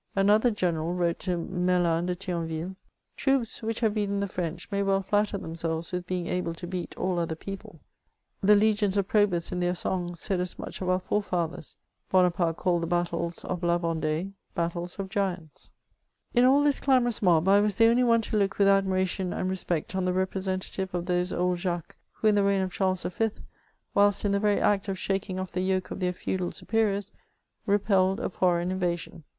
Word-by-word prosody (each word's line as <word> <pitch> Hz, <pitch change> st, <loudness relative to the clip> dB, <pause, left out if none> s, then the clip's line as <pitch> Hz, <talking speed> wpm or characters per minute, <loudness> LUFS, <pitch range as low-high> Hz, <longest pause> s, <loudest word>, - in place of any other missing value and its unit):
Another 210 Hz, +4 st, +4 dB
general 175 Hz, -5 st, -1 dB
wrote 170 Hz, -1 st, 0 dB
to 180 Hz, -2 st, -1 dB
Merlin 175 Hz, -1 st, +1 dB
de 180 Hz, -, -1 dB
Thionville: 170 Hz, -1 st, -4 dB, 0.2 s
" -, -, -47 dB
Troops 270 Hz, -4 st, 0 dB
which 225 Hz, +1 st, -3 dB
have 220 Hz, -3 st, +2 dB
beaten 200 Hz, -2 st, -1 dB
the 200 Hz, -, -1 dB
French, 175 Hz, -2 st, -4 dB
may 200 Hz, 0 st, 0 dB
well 195 Hz, 0 st, +1 dB
flatter 205 Hz, +1 st, +1 dB
themselves 165 Hz, -1 st, -4 dB
with 180 Hz, 0 st, -4 dB
being 180 Hz, -1 st, -2 dB
able 170 Hz, -2 st, -2 dB
to 175 Hz, -, -7 dB
beat 180 Hz, 0 st, -5 dB
all 180 Hz, -1 st, 0 dB
other 165 Hz, -1 st, -2 dB
people." 190 Hz, -3 st, -9 dB, 0.6 s
The 210 Hz, +2 st, +6 dB
legions 205 Hz, -1 st, +2 dB
of 195 Hz, -1 st, +1 dB
Probus, 200 Hz, -6 st, +2 dB
in 180 Hz, -, -2 dB
their 180 Hz, 0 st, 0 dB
songs, 175 Hz, -1 st, -2 dB
said 190 Hz, +2 st, -1 dB
as 180 Hz, 0 st, -2 dB
much -, -, -7 dB
of 185 Hz, -, -1 dB
our 185 Hz, -, +3 dB
fathers. 180 Hz, -5 st, -2 dB, 0.3 s
Bonaparte 175 Hz, -3 st, +2 dB
called 175 Hz, -2 st, +1 dB
the 165 Hz, -, -2 dB
battles 170 Hz, 0 st, -2 dB
of 180 Hz, -1 st, -3 dB
La 175 Hz, -1 st, +2 dB
Vendee 165 Hz, +2 st, -2 dB
" -, -, -43 dB
battles 170 Hz, +1 st, -3 dB
of 195 Hz, -1 st, -4 dB
giants." 185 Hz, -6 st, -4 dB, 0.6 s
In 245 Hz, 0 st, +5 dB
all 275 Hz, +3 st, +5 dB
this 290 Hz, -1 st, +2 dB
clamorous 250 Hz, -4 st, +2 dB
mob, 175 Hz, -3 st, +4 dB
I 200 Hz, +1 st, +6 dB
was 205 Hz, -1 st, +1 dB
the 225 Hz, -, +6 dB
only 235 Hz, +2 st, +4 dB
one 230 Hz, -1 st, +4 dB
to 220 Hz, -, -2 dB
look 195 Hz, -2 st, +1 dB
with 200 Hz, -, +4 dB
admiration 190 Hz, -1 st, +2 dB
and 185 Hz, -, -2 dB
respect 180 Hz, -2 st, -2 dB
on 190 Hz, -, 0 dB
the 180 Hz, -, +1 dB
representative 190 Hz, 0 st, -2 dB
of 175 Hz, -1 st, -2 dB
those 180 Hz, 0 st, 0 dB
old 180 Hz, 0 st, 0 dB
Jacques^ 175 Hz, -2 st, -3 dB, 0.2 s
who 220 Hz, -, 0 dB
in 215 Hz, -, +5 dB
the 205 Hz, -1 st, +3 dB
reign 200 Hz, -1 st, +2 dB
of 185 Hz, -, -3 dB
Charles 185 Hz, -1 st, 0 dB
V., 225 Hz, +5 st, 0 dB, 0.6 s
whilst 205 Hz, 0 st, +3 dB
in 200 Hz, -, +2 dB
the 200 Hz, -, +2 dB
very 205 Hz, -1 st, +2 dB
act 200 Hz, -1 st, +2 dB
of 195 Hz, -1 st, -2 dB
shaking 195 Hz, 0 st, -2 dB
off 185 Hz, -1 st, -4 dB
the 180 Hz, -, -2 dB
yoke 185 Hz, 0 st, -1 dB
of -, -, -5 dB
their 180 Hz, -1 st, +1 dB
feudal 180 Hz, 0 st, -3 dB
superiors, 205 Hz, -3 st, -1 dB, 0.6 s
repelled 195 Hz, -1 st, +2 dB
a -, -, -3 dB
foreign 175 Hz, -1 st, +1 dB
invasion. 175 Hz, -3 st, -3 dB
185 Hz, 200 wpm, -27 LUFS, 175-200 Hz, 0.6 s, The